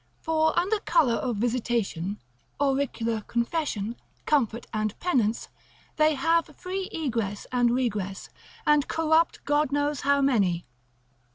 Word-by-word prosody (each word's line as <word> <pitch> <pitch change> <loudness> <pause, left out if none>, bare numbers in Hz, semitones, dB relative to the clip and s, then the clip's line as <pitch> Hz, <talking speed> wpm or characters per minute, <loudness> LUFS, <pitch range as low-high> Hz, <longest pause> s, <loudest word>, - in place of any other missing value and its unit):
For 315 0 +1
under 395 +5 +2
colour 325 -11 +3
of 245 0 -1
visitation, 220 -5 -1 0.4
auricular 265 -5 0
confession, 235 -3 -1 0.3
comfort 240 -6 +1
and 215 -1 -2
penance, 235 -11 0 0.5
they 310 0 +4
have 330 +4 +2
free 375 +1 -4
egress 230 -10 -2
and 245 -1 +3
regress, 210 -6 -2 0.4
and 295 -1 +4
corrupt, 325 +1 +1
God 290 -1 +2
knows, 290 0 0
how 280 0 +3
many. 200 -11 +2
265 Hz, 115 wpm, -26 LUFS, 225-310 Hz, 0.5 s, they